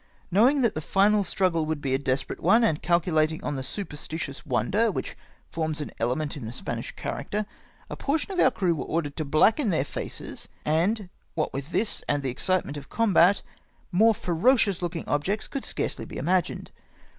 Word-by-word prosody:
Know 215 +8 +6
ing 285 -1 +1
that 230 - +3
the 155 - -3
final 200 +5 +3
struggle 175 -5 +1
woidd 155 -1 -1
be 135 -2 -2
a 135 - +2
desperate 135 -1 -2
one, 235 +1 +4
and 160 -9 +2
calculating 160 -2 +1
on 145 - -2
the 135 - -3
superstitious 150 -4 -5
wonder 210 - +2
which - - -4 0.4
forms 160 -2 -2
an 150 - -5
element 140 +7 -1
in 130 -7 -6
the - - -5
Spanish - - -5
character, 210 +1 -3 0.4
a - - -6
portion 300 +7 -1
of 370 - -2
om* 260 - +6
crew 185 -8 +1
were 155 - -3
ordered 155 -3 -2
to 155 - -1
blacken 215 - +3
their 155 -6 +1
faces, - - -6 0.2
and 180 +6 +1 0.3
what 155 - -1
with 140 +4 -5
this 215 +4 0
and 145 -1 +1
the 130 - -1
excitement 180 +1 0
of 140 -1 -9
combat, 200 -4 +4 0.5
more 220 +5 +5
ferocious 195 +3 +2
looking 170 -2 -3
objects 180 +9 -1
could 275 - -4
scarcely - - -3
be - - -8
imagined. 180 -1 0
170 Hz, 185 wpm, -26 LUFS, 150-205 Hz, 0.5 s, Know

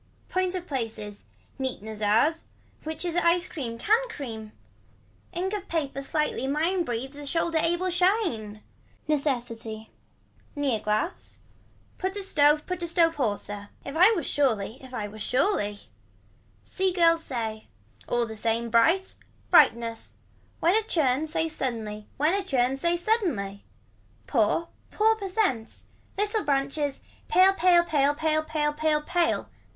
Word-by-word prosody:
Points 370 0 0
of 360 -1 -4
places. 220 - -5 0.3
Neat 260 -6 -3
Nezars. 220 +9 +1 0.4
Which 320 +3 -4
is 345 -1 -2
a 345 0 +4
cream, 240 -8 -5
can 450 - +2
cream. 225 - -7 0.8
Ink 370 +3 -2
of 405 -2 -4
paper 280 -5 -2
slightly 275 -2 -1
mine 330 +6 +1
breathes 265 +1 -4
a 290 - -7
shoulder 330 +1 0
able 345 +3 +1
shine. 350 - 0 0.4
Necessity. 235 -7 -2 0.6
Near 275 -6 0
glass. 215 - -2 0.6
Put 380 +1 -2
a 405 - -4
stove 300 -4 +3
put 365 -1 -4
a 340 - -2
stove 330 -1 +2
hoarser. 205 -4 -2 0.2
If 280 - -6
I 365 +5 +7
was 340 -9 -2
surely 235 -5 0
if 260 -1 -12
I 215 -5 -3
was 215 +1 -10
surely. 245 - 0 0.8
See 380 0 0
girl 335 -2 +4
says. 225 -8 -3 0.5
All 240 0 +1
the 220 -1 -7
same 230 +1 -1
bright. 330 - +3 0.4
Brightness. 230 0 +3 0.5
When 340 +2 +4
a 440 - +4
churn 310 - +1
say 325 +1 0
suddenly 225 -8 -4
when 305 +5 +2
a 400 0 0
churn 265 -7 +1
say 340 +5 +1
suddenly. 335 - -1 0.6
Poor 270 +7 +1 0.2
pour 440 +1 +3
percent. 390 - -1 0.3
Little 420 +1 0
branches. 280 0 0 0.3
Pale. 380 -2 +5
Pale. 355 -2 +5
Pale. 290 -3 +2
Pale. 310 0 +1
Pale. 300 -1 0
Pale. 305 0 +1
Pale. 345 +1 0
295 Hz, 140 wpm, -27 LUFS, 230-350 Hz, 0.8 s, I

